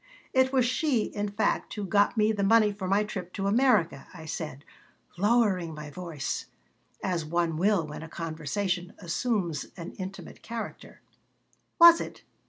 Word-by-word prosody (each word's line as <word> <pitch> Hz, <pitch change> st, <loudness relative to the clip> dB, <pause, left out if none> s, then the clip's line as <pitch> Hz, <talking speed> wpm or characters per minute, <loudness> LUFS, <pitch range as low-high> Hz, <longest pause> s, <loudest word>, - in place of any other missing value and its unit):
"It 260 Hz, 0 st, +4 dB
was 260 Hz, -3 st, +3 dB
she, 255 Hz, -2 st, +1 dB
in 205 Hz, 0 st, -3 dB
fact, 205 Hz, +2 st, -1 dB
who 210 Hz, -2 st, -3 dB
got 205 Hz, +4 st, +2 dB
me 215 Hz, 0 st, +4 dB
the 205 Hz, -2 st, -2 dB
money 215 Hz, +1 st, +5 dB
for 200 Hz, -2 st, -5 dB
my 200 Hz, +3 st, +3 dB
trip 185 Hz, -4 st, -6 dB
to 195 Hz, -, -3 dB
America," 205 Hz, -, +2 dB
I 160 Hz, -2 st, -9 dB
said, 150 Hz, -2 st, -6 dB, 0.5 s
lowering 195 Hz, -5 st, +2 dB
my 150 Hz, -1 st, -8 dB
voice, 170 Hz, -4 st, -4 dB, 0.6 s
as 175 Hz, -3 st, 0 dB
one 165 Hz, +1 st, 0 dB
will 190 Hz, 0 st, +2 dB
when 150 Hz, 0 st, -8 dB
a 160 Hz, -, -8 dB
conversation 175 Hz, +4 st, -3 dB
assumes 175 Hz, -, -1 dB
an 170 Hz, 0 st, -6 dB
intimate 190 Hz, -1 st, -7 dB
character 230 Hz, -1 st, -7 dB, 0.8 s
"Was 340 Hz, -1 st, +9 dB
it?" -, -, -8 dB
195 Hz, 155 wpm, -28 LUFS, 165-215 Hz, 0.8 s, Was